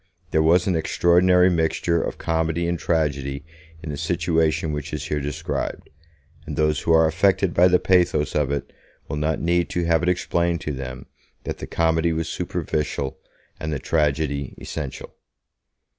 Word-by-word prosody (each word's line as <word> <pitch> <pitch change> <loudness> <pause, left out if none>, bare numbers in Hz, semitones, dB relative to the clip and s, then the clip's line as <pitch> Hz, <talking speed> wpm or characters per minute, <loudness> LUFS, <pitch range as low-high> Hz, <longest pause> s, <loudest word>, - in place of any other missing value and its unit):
There 80 - +3
was 85 +3 +4
an 95 - +1
extraordinary 90 +3 +4
mixture 85 0 +1
of - - -4
comedy 80 +1 -1
and 85 -1 -1
tragedy 70 -4 -1 0.4
in 80 - -4
the 70 - -5
situation 80 -1 0
which 75 0 -5
is 75 -1 -3
here 75 - 0
described, 75 +3 -4 0.6
and 75 - -4
those 75 -2 +2
who - - -1
are 80 0 +6
affected 95 +2 +2
by 90 +1 +6
the 90 0 +5
pathos 90 -5 +2
of 75 -2 +1
it 70 - -4 0.3
will 75 - -4
not 75 +1 0
need 85 0 +1
to 90 - -1
have 85 -1 +3
it 90 - +1
explained 85 -1 0
to 75 - -3
them 65 -2 -6 0.4
that - - -5
the - - -6
comedy 80 0 +1
was 80 0 -2
superficial 70 -2 -3 0.4
and 80 - -3
the 75 - -1
tragedy 70 -2 -1
essential. 70 -4 -6
80 Hz, 165 wpm, -23 LUFS, 75-85 Hz, 0.6 s, are